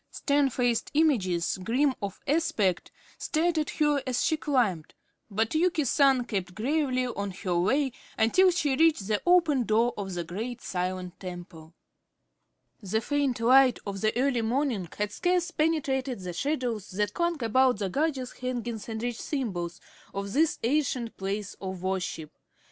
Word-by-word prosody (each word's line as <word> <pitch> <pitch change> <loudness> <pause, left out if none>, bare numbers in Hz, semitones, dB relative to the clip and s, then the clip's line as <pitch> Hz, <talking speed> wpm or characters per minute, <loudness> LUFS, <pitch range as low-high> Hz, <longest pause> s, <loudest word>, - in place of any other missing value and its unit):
Stern 285 -1 +1
faced 245 -2 0
images, 190 - +2
grim 260 +6 +2
of 200 -1 -5
aspect, 230 - 0 0.3
stared 330 +1 +1
at 305 - -1
her 295 -2 +1
as 250 -1 0
she 315 - +2
climbed, 240 - 0 0.3
but 220 +2 0
Yuki 325 -2 +2
San 270 -1 +3
kept 190 -6 -3
gravely 255 +1 0
on 200 -5 -3
her 180 -1 -3
way 265 +9 +2 0.3
until 370 +13 +5
she 295 -6 +1
reached 315 -8 +3
the 210 -1 0
open 330 -7 +4
door 230 +2 +2
of 195 -3 -5
the 175 - -2
great 220 +9 -5
silent 180 -1 -4
temple. 175 -3 -9 1.1
The 210 +2 -1
faint 275 0 0
light 255 +1 +6
of 195 -1 -5
the 215 - +2
early 255 -3 +2
morning 230 - -1
had 210 0 -1
scarce 355 - 0
penetrated 275 - 0
the 180 -1 -5
shadows 245 - -2
that 205 +1 -1
clung 340 -5 -1
about 255 +2 +3
the 200 -1 -2
gorgeous 270 - -1
hangings 240 -3 -4
and 220 0 -4
rich 240 -1 -3
symbols 185 - -3 0.4
of 200 0 -4
this 315 +2 +2
ancient 250 -2 0
place 200 +1 -3
of 190 -2 -5
worship. 180 -5 -3
240 Hz, 155 wpm, -28 LUFS, 195-285 Hz, 1.1 s, light